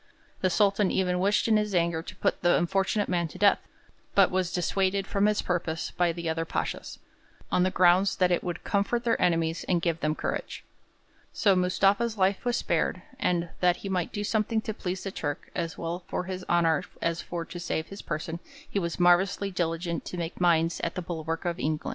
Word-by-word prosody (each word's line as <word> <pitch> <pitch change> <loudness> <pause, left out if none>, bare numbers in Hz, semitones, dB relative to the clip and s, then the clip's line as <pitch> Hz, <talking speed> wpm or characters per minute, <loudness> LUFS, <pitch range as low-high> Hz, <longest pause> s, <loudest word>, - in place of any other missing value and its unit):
The 185 - +3
Sultan 200 0 +3
even 180 -1 +1
wished 200 +4 +2
in 220 -1 +4
his 210 -2 -1
anger 170 -1 +1
to - - -10
put - - 0
the 175 0 +4
unfortunate 195 +3 +1
man 175 -2 0
to 155 - -11
death, 205 -1 +5 0.6
but 195 -2 +5
was 185 -1 0
dissuaded 190 +2 0
from 200 +1 +2
his 210 0 +1
purpose 170 -2 -2
by 175 -1 +1
the 170 0 -5
other 160 0 0
pashas, 165 - -4 0.5
on - - +3
the 185 - +3
ground 185 +1 +4
that 180 -1 +3
'it 175 - +1
would 175 -1 -4
comfort 210 +3 0
their 235 -2 +1
enemies 165 -2 +1
and 180 -2 +2
give 165 -2 0
them 155 -1 0
courage.' - - -4 0.7
So 200 -3 +3
Mustafa's 195 +5 +2
life 190 0 +2
was 245 0 +1
spared, - - 0 0.2
and 175 -7 0
'that 180 -1 +4
he - - -2
might 180 -3 -1
do 205 -1 -3
something 220 +1 +1
to 220 - -4
please 185 -2 -4
the 195 - -4
Turk, 145 -5 -4
as 165 -2 -3
well 170 +2 -4
for - - -2
his 185 0 -5
honour 165 -3 +3 0.2
as 170 0 -1
for 170 -1 -5
to 175 - -8
save 165 -2 -3
his 195 - -8
person, 165 +2 -4 0.3
he 200 - -1
was 170 -2 -3
marvellously 180 +3 +3
diligent 170 -1 -2
to 180 - -6
make 170 +1 -4
mines 165 -1 +3
at 170 - -2
the 180 - -3
bulwark 165 -1 -4
of 175 -1 -1
England.' 155 0 -1
180 Hz, 205 wpm, -28 LUFS, 170-195 Hz, 0.7 s, death